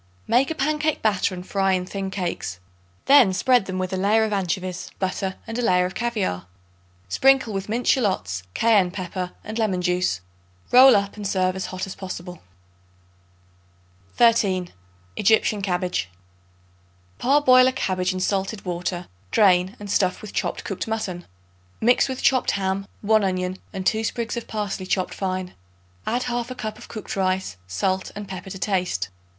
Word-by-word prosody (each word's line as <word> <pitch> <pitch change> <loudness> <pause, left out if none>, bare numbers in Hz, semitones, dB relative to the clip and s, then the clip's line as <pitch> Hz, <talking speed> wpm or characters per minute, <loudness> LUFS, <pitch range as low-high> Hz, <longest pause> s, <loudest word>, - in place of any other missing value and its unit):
Make 255 +3 +3
a 320 - -2
pancake 305 +1 0
batter 200 -3 +1
and 180 0 -8
fry 195 -1 +1
in 180 -1 0
thin 195 +1 -4
cakes. 175 - -4 0.5
Then 270 -9 +6
spread 245 +3 +3
them 185 -1 -4
with 185 0 -2
a - - 0
layer 210 +4 +3
of 215 -1 -1
anchovies, 185 -1 -2
butter 190 0 -2
and 225 +1 -4
a - - +1
layer 180 -5 +3
of 185 - -4
caviare. 210 - -2 0.6
Sprinkle 260 - +3
with 195 +1 -4
minced 235 +3 +2
shallots, 100 - 0
cayenne 210 -5 +4
pepper 180 0 -5
and 220 +2 -5
lemon 205 -5 +1
juice. 180 - 0 0.5
Roll 260 +1 +9
up 200 +1 0
and 205 -1 -3
serve 185 -1 +1
hot 185 0 -4
as 195 - -7
possible. 180 -2 -7 1.7
13. 200 -7 +3 0.5
Egyptian 215 0 +3
Cabbage. 180 - -1 1.1
Parboil 255 -1 +5
a - - +3
cabbage 185 -7 -1
in 185 - -3
salted 195 +2 -1
water; 175 0 -3 0.2
drain 185 - +3
and 205 -1 -6
stuff 185 -3 +1
with 215 - -8
chopped - - -2
cooked 195 - -4
mutton. 195 -6 -3 0.5
Mix 245 +4 +3
with 260 - -4
chopped 255 -2 +3
ham, 195 0 -2
1 215 0 +3
onion 185 0 -1
and 190 -1 -5
2 220 +3 +2
sprigs 230 +1 -2
of 235 - -5
parsley 205 -3 -3
chopped 185 -1 0
fine. 185 -1 -3 0.5
Add 245 +2 0
1/2 245 +1 -3
cup 215 -1 -5
of - - -12
cooked 215 - -6
rice, 185 - -1
salt 185 - -1
and 205 0 -6
pepper 190 0 -7
to 195 - -6
taste. 180 - -1
195 Hz, 160 wpm, -23 LUFS, 185-220 Hz, 1.7 s, Roll